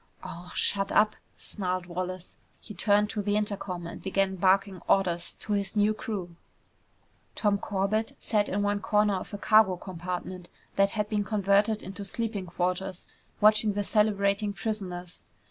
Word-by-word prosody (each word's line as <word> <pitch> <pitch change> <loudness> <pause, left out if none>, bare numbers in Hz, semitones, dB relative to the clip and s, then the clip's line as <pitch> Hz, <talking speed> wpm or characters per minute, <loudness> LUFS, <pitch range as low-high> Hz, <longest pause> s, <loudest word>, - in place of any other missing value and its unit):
"Aw 175 +1 -8
shut 195 -1 +1
up!" 215 0 +4 0.2
snarled 185 -3 -2
Wallace. 180 +1 -5 0.2
He 210 - -10
turned 210 +2 +2
to 210 - -2
the 205 +1 +1
intercom 200 -4 -3
and 170 - -7
began 190 0 0
barking 190 0 +2
orders 175 -3 +1
to 210 - -2
his 200 0 -1
new 210 +1 +4
crew. 190 -6 -5 1.0
Tom 205 -2 +2
Corbett 205 +3 -1
sat 210 -2 +1
in 205 +1 0
one 205 0 +1
corner 210 0 +2
of - - -7
a 205 - -4
cargo 210 -3 +5
compartment 180 0 -6 0.3
that 195 0 +4
had 210 -1 +1
been 210 -1 0
converted 205 +1 +2
into 195 +2 -7
sleeping 205 -2 -3
quarters, 180 +2 -2 0.4
watching 215 0 +5
the 205 0 -1
celebrating 205 -1 +2
prisoners. 180 -5 -5
200 Hz, 150 wpm, -28 LUFS, 185-210 Hz, 1.0 s, cargo